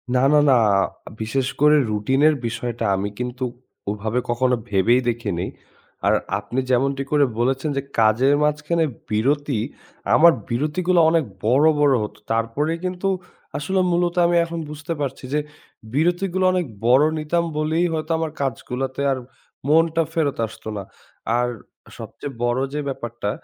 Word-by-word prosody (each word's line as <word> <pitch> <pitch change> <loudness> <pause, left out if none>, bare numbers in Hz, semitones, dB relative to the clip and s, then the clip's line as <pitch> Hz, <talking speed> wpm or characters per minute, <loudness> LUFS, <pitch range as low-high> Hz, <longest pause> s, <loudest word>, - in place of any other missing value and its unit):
না, 125 - +3
না, 150 - +6
না, 130 - +6 0.6
বিশেষ 125 +4 -1
করে 150 0 +6 0.2
রুটিনের 135 +9 +3
বিষয়টা 115 0 -3
আমি 100 +2 -2
কিন্তু 125 +1 -4 0.5
ওভাবে 110 +4 -2
কখনো 125 +1 +2
ভেবেই 105 +6 +3
দেখিনি। 100 -7 -2 0.6
আর - - +5 0.3
আপনি 130 - -3
যেমনটি 135 +2 +1
করে 145 -1 +4
বলেছেন 135 +4 0
যে, 140 - +1 0.2
কাজের 115 +6 +4
মাঝখানে 150 +2 +1 0.2
বিরতি, 135 +3 +1 0.6
আমার 170 +1 +7 0.2
বিরতিগুলো 155 +8 +1
অনেক 165 -2 +2 0.2
বড়, 130 +6 +4
বড় 145 -2 +4
হতো। 105 - -7
তারপরেই 125 +9 0
কিন্তু 185 +1 -2 0.5
আসলে 190 +7 -1
মূলত 175 0 +1
আমি 175 0 +2
এখন 170 0 -5
বুঝতে 150 +2 -5
পারছি 135 -1 -4
যে 150 - +3 0.5
বিরতিগুলো 175 +4 +1
অনেক 180 -1 0 0.2
বড় 130 +4 +6 0.2
নিতাম 170 +3 0
বলেই 160 +3 +1
হয়তো 155 +1 -3
আমার 160 -1 -2
কাজগুলাতে 130 0 -3
আর 130 - 0 0.5
মনটা 165 +2 +3
ফেরত 155 -4 0
আসতো 110 - -13
না। 100 - -4 0.5
আর 125 0 +1 0.5
সবচেয়ে 140 - -8
বড় 120 +1 +1
যে 150 - -2
ব্যাপারটা 120 -5 -4
140 Hz, 140 wpm, -22 LUFS, 120-160 Hz, 0.6 s, আমার